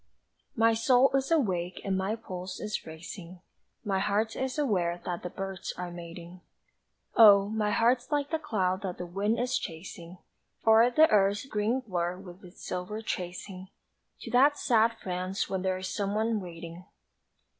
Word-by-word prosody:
My 230 -1 +4
soul 245 +4 +4
is 270 0 0
awake 185 - 0
and 195 -1 0
my 190 +3 -1
pulse 185 -5 -7
is 210 -5 -4
racing 170 +2 -9 0.5
My 195 -2 0
heart 210 +3 0
is 260 +2 -3
aware 180 -11 0
that 175 -1 -3
the 180 - -5
birds 195 0 -5
are 180 -1 -5
mating 175 +1 -10 0.7
Oh, 200 -3 +8
my 215 -1 0
heart's 240 +5 +2
like 290 +1 -1
a 320 - +1
cloud 190 -9 -1
that 185 -4 -4
the 180 - -5
wind 200 +6 -1
is 250 +1 0
chasing 170 +1 -8 0.5
O'er 225 +2 +6
the 310 +6 +6
earth's 205 +2 +3
green 225 +1 0
blur 180 -5 -2
with 185 +1 -12
its 180 0 -13
silver 185 +5 -4
tracing 185 0 -5 0.5
To 230 - -7
that 280 +4 +5
sad 230 -2 +3
France 185 0 -3
where 190 - 0
there's 185 0 -2
someone 215 +2 -1
waiting! 170 0 -9
195 Hz, 155 wpm, -29 LUFS, 180-225 Hz, 0.7 s, Oh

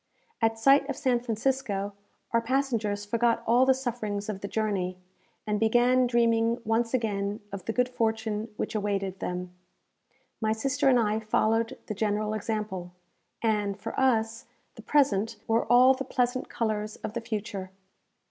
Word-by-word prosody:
At 225 0 +2
sight 275 +4 +4
of 280 - -3
San 255 -4 +2
Francisco, 225 -4 -1 0.4
our 230 - +3
passengers 230 -5 -1
forgot 230 +2 +1
all 245 +3 +4
the 265 - +5
sufferings 220 -5 -3
of 195 -2 -4
the 200 - -4
journey, 195 -4 -1 0.5
and 210 -1 0
began 245 +3 +4
dreaming 230 -1 +2
once 230 +2 +1
again 205 -3 -1
of 195 -2 -7
the - - -1
good 250 +2 +2
fortune 220 -2 -2
which - - -3
awaited 200 -3 -2
them. 180 0 -4 0.9
My 220 0 +2
sister 275 +5 +1
and 250 -2 +5
I 215 -1 +1
followed 225 +2 +1
the 215 - -4
general 210 +1 -1
example, 210 -4 -3 0.5
and, 210 -2 0
for 225 +2 -5
us, 230 -3 +1 0.3
the - - -11
present 230 -7 +2
wore 225 +1 +2
all 250 +2 +7
the 265 - -4
pleasant 255 -1 -1
colours 215 -2 -2
of 210 - -4
the 235 - -3
future. 205 -4 -4
225 Hz, 155 wpm, -28 LUFS, 210-245 Hz, 0.9 s, all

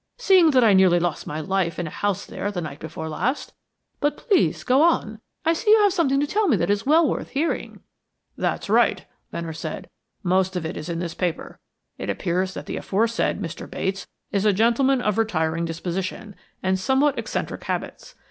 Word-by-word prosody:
"Seeing 380 -8 +5
that 260 -4 +4
I 215 -3 +6
nearly 185 -2 +5
lost 175 0 -2
my 150 - -4
life 185 0 -1
in 175 - -2
a 155 - -6
house 205 -3 -2
there 205 - -4
the 190 - -3
night 155 -3 -6
before 160 +1 -6
last. 210 - -2 0.5
But 290 +1 0
please 405 -5 +1
go 260 +3 +3
on. 225 -10 +1 0.2
I 330 - +4
see 335 - -2
you 435 - +8
have 405 -3 +4
something 280 -7 +2
to 290 - +2
tell 415 +7 +1
me 250 - +3
that 170 +3 +1
is 205 +4 -1
well 315 +2 +5
worth - - -3
hearing." 295 +5 -2 0.5
"That's - - -2
right," - - +3 0.3
Venner 165 -1 -4
said. 155 0 -6 0.3
"Most 185 +1 +1
of 175 -3 -2
it 160 - -4
is 155 - -6
in 170 - -2
this 170 -1 -3
paper. 180 -3 -3 0.4
It - - -4
appears 185 +1 -1
that - - -6
the - - -4
aforesaid 225 +3 0
Mr. 170 -5 -6
Bates 190 0 -3 0.2
is 200 -1 0
a 210 -1 +4
gentleman 240 +5 +3
of 210 -1 0
retiring 165 -6 0
disposition, 185 +5 -4 0.3
and 190 0 +1
somewhat 265 +8 +2
eccentric - - -4
habits. - - -5
195 Hz, 195 wpm, -23 LUFS, 175-265 Hz, 0.5 s, you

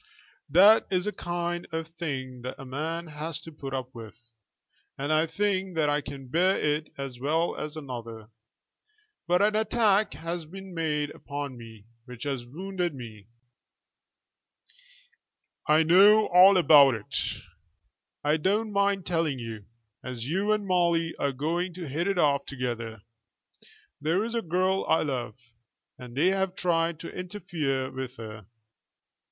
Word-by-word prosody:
That 200 +6 +7
is 180 -1 0
a 210 - 0
kind 175 -2 -3
of 160 0 -4
thing 135 -7 -5
that 125 +1 -6
a 135 - -8
man 160 +6 -3
has 155 +1 -5
to 165 - -10
put 140 -3 -7
up 130 -1 -4
with, 110 -2 -10 0.8
and 145 +3 -1
I 155 +1 +3
think 190 +1 -1
that 150 -2 +2
I 145 0 +1
can 135 -1 -9
bear 180 +8 +2
it 150 +1 0
as 135 -3 -6
well 160 +6 0
as 150 +1 -6
another. 115 -6 -7 1.0
But 180 +3 +3
an 210 +1 +3
attack 215 -1 +2
has 165 -1 -5
been 190 +2 -10
made 150 -3 -1
upon 140 -2 -6
me 115 -3 -12 0.2
which 125 -1 -9
has 135 -4 -3
wounded 180 +3 -3
me." 110 -5 -10 2.4
"I 155 +1 +5
know 200 +6 +7
all 185 +2 +8
about 145 -7 +7
it." 105 -2 -8 1.1
"I 150 +2 +3
don't 210 +7 0
mind 200 -2 +1
telling 165 -5 0
you, 115 -4 -7 0.4
as 125 -2 -6
you 195 +7 0
and 210 -1 +1
Molly 170 -3 +1
are 140 - 0
going 165 +6 -2
to 175 -3 -6
hit 160 +7 -2
it 195 -2 0
off 145 -4 +2
together. 120 -5 -4 1.0
There 165 +7 +1
is 230 +1 -4
a 230 - 0
girl 185 +1 +1
I 160 - +4
love, 125 -7 -3 0.6
and 125 -1 -10
they 170 +6 +4
have 190 -1 0
tried 165 -3 0
to - - -8
interfere 160 -8 -3
with 130 -1 -6
her." 110 -3 -9
160 Hz, 150 wpm, -27 LUFS, 130-180 Hz, 2.4 s, all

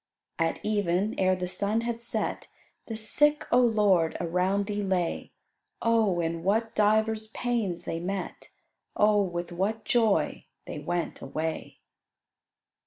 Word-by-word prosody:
"At 165 0 0
even, 205 -1 0
ere 185 -1 +3
the 180 0 -3
sun 200 +5 +1
had 235 0 -3
set, 235 - -2 0.4
The 225 - -4
sick, 295 +7 +3
O 245 - +5
Lord, 205 -8 +3
around 180 +4 0
Thee 205 0 -3
lay; 185 -4 -1 0.5
Oh, 225 -6 +2
in 165 0 -2
what 220 +5 0
divers 220 +1 +2
pains 225 -6 -2
they 165 - -3
met, 190 +2 -5 0.5
Oh, 210 0 +4
with 175 -2 -3
what 210 +5 -2
joy 220 -10 +1 0.2
they - - -6
went 170 +3 -3
away!" 155 +4 -4
200 Hz, 130 wpm, -27 LUFS, 175-220 Hz, 0.5 s, O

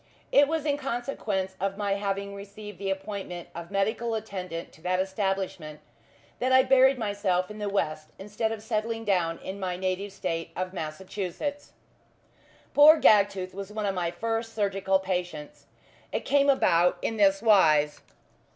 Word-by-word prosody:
It 285 0 +6
was 320 0 -2
in 285 -2 +1
consequence 235 -8 -3
of 195 +1 -2
my 205 -1 -1
having 200 0 -2
received 200 0 -10
the 195 -1 -3
appointment 195 -3 -5
of 170 0 -8
medical 220 +4 0
attendant 185 -6 -5
to - - -19
that 185 +1 0
establishment 190 -5 -2 0.6
that 255 +1 0
I 260 0 +7
buried 265 0 +5
myself 205 -4 -1
in 210 - -9
the 205 -1 -2
west, 155 -6 -2
instead 210 +3 -3
of 220 -1 -5
settling 225 0 -2
down 175 -5 +1
in 195 +1 -7
my 180 -2 -3
native 190 +2 -2
State 165 -4 -3
of 185 +1 -3
Massachusetts. 190 - -5 1.0
Poor 305 +2 +8
Gagtooth 200 -3 +4
was 195 +1 -7
one 210 0 -3
of 195 - 0
my 175 -2 -1
first 225 +5 -3
surgical 195 -2 +1
patients. 180 -5 -5 0.4
It - - -3
came 285 0 +3
about 180 -10 +3
in 225 - -1
this 195 0 +3
wise. 155 -9 +4
195 Hz, 155 wpm, -27 LUFS, 185-220 Hz, 1.0 s, Poor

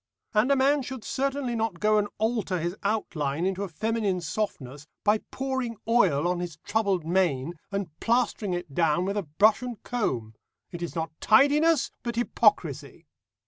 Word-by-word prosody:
And 220 +5 +3
a - - +5
man 275 +2 +3
should 260 -2 -7
certainly 270 -1 -1
not 220 -6 -2
go 215 +2 +3
and 205 - 0
alter 220 -4 0
his 170 +2 -2
outline 170 -7 -1
into 190 0 -1
a 200 - -2
feminine 210 +1 -1
softness, 150 -5 -4 0.2
by 210 +1 +3
pouring 260 -3 -3
oil 180 -10 +3
on 180 0 0
his 175 -3 -5
troubled 200 -6 0
mane 170 -4 +1 0.2
and 195 -4 -3
plastering 230 -5 +1
it 175 -5 -6
down 165 +2 +2
with 200 +1 -2
a 205 - 0
brush 200 +8 +3
and 245 -3 -5
comb. 125 - -2 0.4
It 175 - -7
is 170 - -4
not 160 -1 -2
tidiness, 290 +6 +4
but 235 -1 -4
hypocrisy. 240 +1 +1
205 Hz, 165 wpm, -27 LUFS, 170-235 Hz, 0.4 s, a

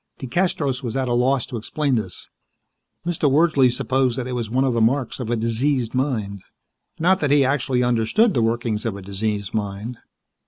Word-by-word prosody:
DeCastros 140 -2 -1
was 120 -1 -3
at 130 -1 -1
a 120 - 0
loss 125 +1 +2
to 125 - -6
explain 140 +5 -1
this. 105 -6 -3 0.8
Mr. 165 -4 +1
Wordsley 145 -2 +4
supposed 130 0 0
that 130 - -2
it 130 - -5
was 120 -3 -3
one 130 +3 +1
of 130 -2 +1
the 115 - +1
marks 125 +3 +1
of 120 -3 -4
a 120 - +1
diseased 115 +2 0
mind. 110 -7 -2 0.6
Not 185 +4 +3
that 145 - 0
he 140 -1 +4
actually 130 -2 +1
understood 125 - +2
the 120 - +1
workings 115 -1 -1
of 110 -4 -3
a 100 - -9
diseased 100 0 -3
mind. 105 +3 -4
125 Hz, 190 wpm, -22 LUFS, 115-135 Hz, 0.8 s, Wordsley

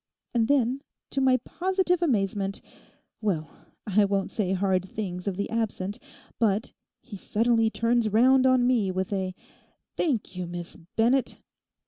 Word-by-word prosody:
And 230 -2 +2
then—to 270 0 -1
my 260 -1 +4
positive 365 -1 0
amazement—well, 195 - -3 0.3
I 210 -1 +3
won't 195 -1 -1
say 210 -6 -1
hard 190 -1 +1
things 180 -3 -5
of 190 -2 -2
the 200 - -1
absent; 220 -2 -2 0.4
but 220 -1 +1 0.3
he 230 - -9
suddenly 225 +3 +2
turns 230 0 +1
round 255 +5 +5
on 255 -1 +4
me 240 -6 +2
with 185 +2 -2
a 190 -1 -2 0.6
"Thank 240 - -1
you, 180 -1 -4
Miss 175 0 -6 0.2
Bennett." 245 +4 +2
220 Hz, 130 wpm, -27 LUFS, 195-250 Hz, 0.6 s, round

